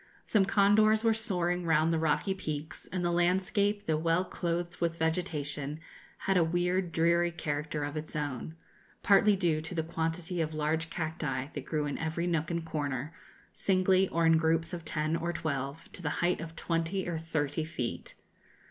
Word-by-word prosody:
Some 205 -3 +3
condors 215 +2 +4
were 225 -1 +4
soaring 180 -5 0
round 160 0 +3
the 160 - +1
rocky 160 +5 +1
peaks, 155 -4 -5
and 180 -1 -1
the 175 - +2
landscape, 190 +4 +1
though 155 -1 +1
well 165 +3 +1
clothed 175 0 -3
with 170 -1 0
vegetation, 150 -3 -2 0.5
had 195 -1 +3
a 175 - +5
weird, 175 +2 0
dreary 170 +1 +3
character 150 -2 -3
of 145 +1 -4
its 155 0 -5
own, 145 +1 -3 0.5
partly 205 +1 +5
due 170 -5 +1
to 165 +3 -6
the 160 - 0
quantity 165 +2 -2
of 155 -1 -2
large 160 +2 0
cacti 155 -5 -3
that 145 -2 -5
grew 155 -2 -1
in 145 - -3
every 165 +1 -1
nook 160 -3 0
and 170 -1 -2
corner, 145 -1 -3 0.4
singly, 190 0 +3
or 170 0 +1
in 165 0 +6
groups 165 +2 +1
of 170 -2 -5
ten 155 +1 -1
or 170 +1 -1
twelve, 145 -1 -3
to - - -9
the 155 - -1 0.2
height 180 -1 +1
of 165 0 -7
twenty 165 +3 -1
or 170 -2 -2
thirty 155 -2 -1
feet. 155 -7 -4
165 Hz, 175 wpm, -30 LUFS, 155-180 Hz, 0.5 s, in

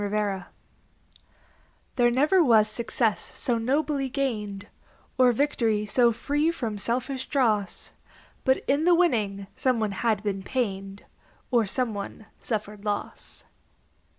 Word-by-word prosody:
SUN 205 - -1
SHADOWS 205 -2 -1 1.5
There 240 -2 +4
never 300 +9 +4
was 220 -6 +5
success 225 0 -1
so 240 -5 -2
nobly 275 +3 0
gained, 215 -7 -3 0.5
Or 250 -1 +6
victory 230 -5 +1
so 240 +3 +3
free 290 +7 0
from 230 -11 -3
selfish 255 +4 -2
dross, 215 -9 0 0.5
But 260 0 +2
in 285 +4 +2
the 350 0 +6
winning 215 - +1
some 255 -3 +1
one 215 -2 0
had 215 +1 0
been 195 -2 -2
pained 195 -4 -3 0.5
Or 235 -4 +3
some 245 +2 -1
one 205 +2 -7
suffered 210 -2 -4
loss. 205 -1 -5
230 Hz, 125 wpm, -26 LUFS, 210-265 Hz, 1.5 s, Or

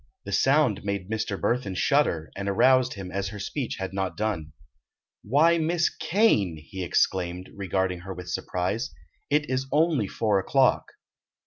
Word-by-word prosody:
The 100 - -6
sound 130 +1 +3
made 100 0 -3
Mr. 110 -2 -2
Burthon 115 -6 -1
shudder, 90 - +1
and 100 +1 -3
aroused 130 +5 +4
him 95 -2 -7
as 100 0 -2
her 105 +2 -7
speech 120 +5 -3
had 95 0 -5
not 95 -1 -2
done. 100 -8 -2 0.7
"Why, 160 +9 +3
Miss 170 +1 +1
Kane!" 135 - +2
he 95 +5 -7
exclaimed, 90 +1 0
regarding 95 -2 -1
her 95 +2 -7
with 90 0 -9
surprise, 100 +9 -2 0.3
"it 150 0 +2
is 130 +1 -1
only 150 - +2
four 105 -1 +1
o'clock." 130 +7 +2
100 Hz, 150 wpm, -26 LUFS, 95-130 Hz, 0.7 s, aroused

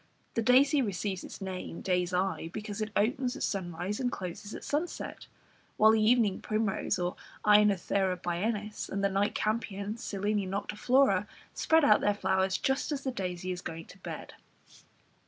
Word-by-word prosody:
The 230 - 0
daisy 270 +5 +5
receives 195 -4 -2
its - - -9
name 185 -3 -5
day's 180 -1 0
eye, 180 -2 -1
because 210 +1 -5
it 215 - -1
opens 250 +4 +1
at - - -4
sunrise 180 +1 -2
and 250 -2 0
closes 190 +3 -6
at - - -8
sunset, 310 +4 -3 0.5
while 220 +1 +7
the 220 0 +3
evening 220 -3 +3
primrose 215 -3 0 0.5
(Aenothera 200 -2 +4
biennis) 210 +5 -2
and 200 0 -2
the 200 - +3
night 195 +2 0
campion 215 -1 -2
(Silene 205 -2 -1
noctiflora) 215 +7 +2 0.3
spread 320 -2 +3
out 210 - +6
their 205 0 +2
flowers 190 -1 +1
just 270 +3 0
as 280 -2 -2
the 265 - -1
daisy 185 -4 -3
is 180 0 -4
going 165 -1 -6
to 190 - -15
bed. - - -7
205 Hz, 155 wpm, -30 LUFS, 190-225 Hz, 0.5 s, while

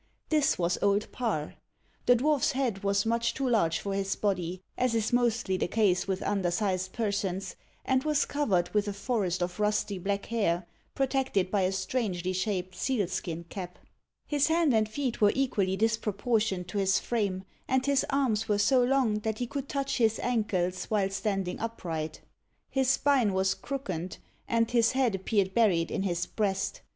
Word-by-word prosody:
This 310 -1 +3
was 175 0 0
Old 200 +1 +1
Parr. 210 -12 -2 0.5
The 245 - +7
dwarfs 285 +2 +2
head 245 -7 -1
was 200 +1 +1
much 235 +1 0
too 270 -1 -1
large 170 -9 +2
for 200 - -4
his 195 0 -1
body, 185 -3 -2
as 250 -2 +1
is 225 +1 0
mostly 235 -5 +1
the - - 0
case 195 -3 +2
with 190 -1 -2
undersized 185 -1 0
persons, 195 -4 -2 0.3
and 260 0 +2
was 300 -1 +2
covered 195 -12 0
with 210 0 +1
a 205 - -2
forest 195 -5 -1
of 180 +2 -4
rusty 210 -2 0
black 200 +2 -2
hair, 190 -6 0 0.3
protected 265 -8 0
by 205 - +2
a 185 0 +2
strangely 190 -2 -2
shaped 185 -1 -2
seal 220 +2 0
skin 170 -2 -4
cap. 180 +1 -7 0.5
His 290 -2 +2
hands 320 -4 +3
and 215 -1 +2
feet 255 0 -3
were 205 -1 +5
equally 200 -8 +1
disproportioned 215 -3 0
to 205 - -2
his 190 -1 +3
frame, 200 -5 -1 0.2
and 260 0 +1
his 280 -1 +3
arms 250 -7 +1
were 205 - +3
so 250 +5 +4
long 245 -4 +2
that 220 0 -2
he 245 - -2
could 275 +2 -5
touch 275 -1 -1
his 225 -3 +3
ankles 185 -7 0
while 200 -3 0
standing 195 -2 -2
upright. 165 -9 -4 0.5
His 265 -2 +1
spine 270 -6 +3
was 190 0 +2
crookened, 185 -11 -5 0.3
and 230 -1 +1
his 235 -1 +3
head 260 -4 +2
appeared 195 0 0
buried 185 -8 +3
in - - -1
his 175 -2 -1
breast. 195 -2 -2
210 Hz, 170 wpm, -29 LUFS, 185-245 Hz, 0.5 s, The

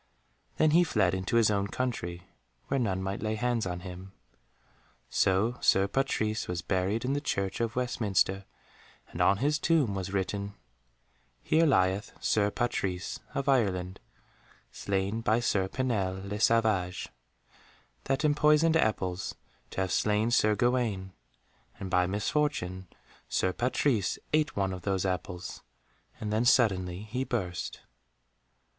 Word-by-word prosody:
Then 155 -1 +4
he 170 +3 +6
fled 95 - +1
into 95 +4 -2
his 115 -2 +5
own 100 -1 0
country, 95 -8 -3 0.5
where 135 - +1
none 95 -6 -1
might 95 +1 -3
lay 110 +1 -1
hands 120 -2 0
on 90 0 -4
him. 95 +1 -9 1.0
So 105 +6 +2
Sir 95 +1 +4
Patrise 110 -2 -1
was 90 -2 -3
buried 95 +6 0
in 135 - 0
the 145 - -1
Church 100 -7 -2
of 115 0 -1
Westminster, 100 -6 0 0.6
and - - -4
on 100 - +4
his 150 +6 +1
tomb 150 -10 +2
was 95 -1 -4
written, 100 +1 -2 0.9
"Here 165 +1 +3
lieth 95 -4 +2
Sir 105 -1 +2
Patrise 100 -6 -2 0.2
of 140 - -2
Ireland, 95 -9 +1 0.7
slain 100 +3 -2
by 110 0 +2
Sir 100 -5 +1
Pinel 100 -6 -2
le 105 +1 -4
Savage, 110 -6 +2 1.0
that 135 +3 0
empoisoned 150 +2 +4
apples 95 - -1 0.3
to - - -3
have 95 -1 -1
slain 105 +4 +1
Sir 110 -3 +4
Gawaine, 115 -6 0 0.7
and 95 -1 -6
by 90 0 +3
misfortune 100 -3 -1 0.4
Sir 95 - +1
Patrise 120 -3 +1 0.2
ate 155 -2 +2
one 95 -1 0
of 90 - -6
those 95 0 -1
apples 90 -1 -4 0.6
and 105 -1 -3
then 110 +2 +2
suddenly 95 -7 +2
he 120 +5 -3
burst." 95 -9 -3
105 Hz, 135 wpm, -29 LUFS, 95-125 Hz, 1.0 s, he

